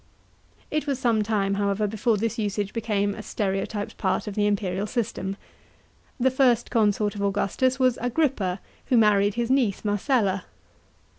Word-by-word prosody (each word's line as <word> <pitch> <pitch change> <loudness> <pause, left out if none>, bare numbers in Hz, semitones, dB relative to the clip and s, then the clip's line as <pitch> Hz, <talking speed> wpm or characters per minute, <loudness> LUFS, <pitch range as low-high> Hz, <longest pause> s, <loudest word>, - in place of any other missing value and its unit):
It 305 -1 -1
was 275 -2 0
some 235 -4 +2
time, 205 -2 0
however, 200 +1 0
before 220 +2 0
this 225 +2 -2
usage 205 -1 -2
became 210 -3 0
a 215 - -7
stereo 195 -2 -2
typed 205 -2 -6
part 190 -2 0
of 210 - -5
the 205 0 +1
imperial 200 -1 -1
system. 200 -4 -3 0.8
The 260 +1 +3
first 250 -3 +2
consort 210 -2 +2
of 205 - -6
Augustus 205 +6 +1
was 255 -2 +2
Agrippa, 245 - 0 0.3
who 255 - +3
married 205 -2 +4
his 240 +1 -1
niece 240 -7 +1
Marcella. 205 -2 +1
210 Hz, 155 wpm, -25 LUFS, 200-240 Hz, 0.8 s, married